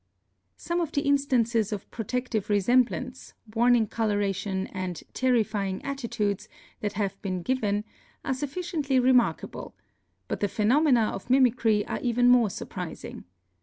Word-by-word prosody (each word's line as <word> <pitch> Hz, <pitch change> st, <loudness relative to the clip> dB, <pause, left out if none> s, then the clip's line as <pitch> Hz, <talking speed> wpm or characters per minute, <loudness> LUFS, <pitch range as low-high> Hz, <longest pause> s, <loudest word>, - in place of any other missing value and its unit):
Some 345 Hz, 0 st, -2 dB
of 325 Hz, -3 st, -2 dB
the 285 Hz, -, +1 dB
instances 245 Hz, -6 st, +2 dB
of 205 Hz, -3 st, -5 dB
protective 230 Hz, -1 st, -3 dB
resemblance, 245 Hz, +5 st, +1 dB, 0.2 s
warn 240 Hz, +2 st, +4 dB
ing 225 Hz, -2 st, +3 dB
coloration 205 Hz, -3 st, -1 dB
and 185 Hz, -4 st, -4 dB
"terrifying 215 Hz, -6 st, 0 dB
attitudes" 215 Hz, -7 st, -2 dB, 0.3 s
that 205 Hz, -1 st, -3 dB
have 200 Hz, -2 st, -3 dB
been 185 Hz, -3 st, -3 dB
given 210 Hz, -5 st, 0 dB, 0.4 s
are 270 Hz, -, 0 dB
sufficiently 290 Hz, -1 st, -1 dB
remarkable, 250 Hz, -, +1 dB, 0.5 s
but -, -, -3 dB
the 205 Hz, -, +1 dB
phenomena 235 Hz, +2 st, +3 dB
of 195 Hz, -, -8 dB
mimicry 240 Hz, -5 st, +3 dB
are -, -, -3 dB
even 245 Hz, 0 st, +3 dB
more 245 Hz, -3 st, +5 dB
surprising. -, -, -7 dB
230 Hz, 130 wpm, -27 LUFS, 205-255 Hz, 0.5 s, more